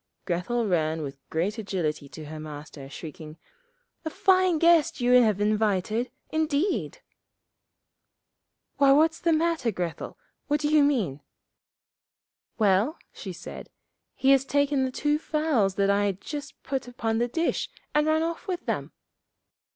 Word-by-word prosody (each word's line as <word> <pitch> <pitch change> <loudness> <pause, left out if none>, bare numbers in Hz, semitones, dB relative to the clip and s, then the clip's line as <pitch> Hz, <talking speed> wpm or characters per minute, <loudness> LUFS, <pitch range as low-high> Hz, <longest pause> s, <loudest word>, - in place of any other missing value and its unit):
Grethel 195 +7 -1
ran 160 -4 0
with 135 -1 -7
great 190 +8 -1
agility 165 -8 -3
to 155 +1 -9
her 155 +1 -8
Master, 150 -2 -9
shrieking, 155 +1 -9 0.7
'A 320 - -3
fine 370 0 +3
guest 335 -1 +4
you 245 0 +2
have 215 -4 +2
invited, 215 +2 +1 0.2
indeed!' 315 +4 -1 1.7
'Why, 275 -1 +6
what's 320 +3 +3
the 335 - +1
matter, 325 -5 +1
Grethel? 175 -5 -4 0.3
What 295 +1 +1
do 295 0 0
you 305 0 +5
mean?' 215 - 0 1.4
'Well,' 210 - +2 0.2
she - - -7
said, - - -9 0.5
'he 270 - +3
has 270 -1 +5
taken 285 -1 +1
the 260 - -3
two 295 +3 0
fowls 300 -12 +1
that 200 0 +2
I 205 +1 +2
had 195 -2 -1
just 295 +4 -8
put 265 -2 -3
upon 225 -2 -2
the 240 - +1
dish, 330 +8 -1 0.2
and 300 +1 +3
run 315 +1 +2
off 335 0 -4
with 365 -2 -3
them.' - - -3
240 Hz, 145 wpm, -26 LUFS, 185-300 Hz, 1.7 s, Why